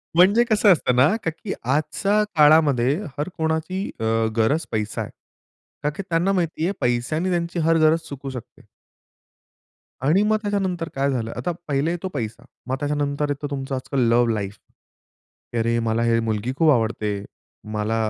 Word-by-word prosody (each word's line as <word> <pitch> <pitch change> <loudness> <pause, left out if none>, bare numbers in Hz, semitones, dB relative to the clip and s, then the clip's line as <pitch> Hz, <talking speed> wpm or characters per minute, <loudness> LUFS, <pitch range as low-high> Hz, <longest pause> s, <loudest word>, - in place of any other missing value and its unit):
म्हणजे 200 +7 +6
कसं 210 -3 +4
असतं 125 -6 0
ना 145 - +4
का - - +1
की 190 +5 -6
आजच्या 195 +10 +1
काळामध्ये 150 -4 +5 0.2
हर 145 +4 -2
कोणाची 160 +4 -1
अ, - - -4 0.3
गरज 145 +9 +2
पैसा 110 -1 -2
आहे. - - -6 0.7
कारण 150 0 0
की 195 - -3
त्यांना 170 +4 +2
माहिती 165 -3 -1
आहे 195 - 0
पैशाने 125 +9 0
त्यांची 170 -1 -1
हर 165 +1 +3
गरज 160 +1 +4
चुकू 140 -1 -6
शकते. 125 -3 -10 1.4
आणि 180 +7 +4
मग 215 +1 +2
त्याच्यानंतर 190 -5 -2
काय 140 +1 +1
झालं 115 -3 -2
आता 175 - -2 0.2
पहिले 145 +2 0
येतो 175 +2 -3
पैसा 120 -2 -4 0.2
मग 130 - 0
त्याच्यानंतर 145 0 -1
येतो 145 +1 -3
तुमचं 135 -1 -3
आजकाल 130 +1 -3
लव्ह 120 0 +3
लाईफ. 100 -1 -4 1.0
की - - -1
"अरे, 115 +1 +1
मला 115 0 0
ही 115 0 +3
मुलगी 115 +1 -1
खूप 160 0 +4
आवडते. 110 -4 0 0.5
मला 105 +1 -1
145 Hz, 160 wpm, -23 LUFS, 120-170 Hz, 1.4 s, म्हणजे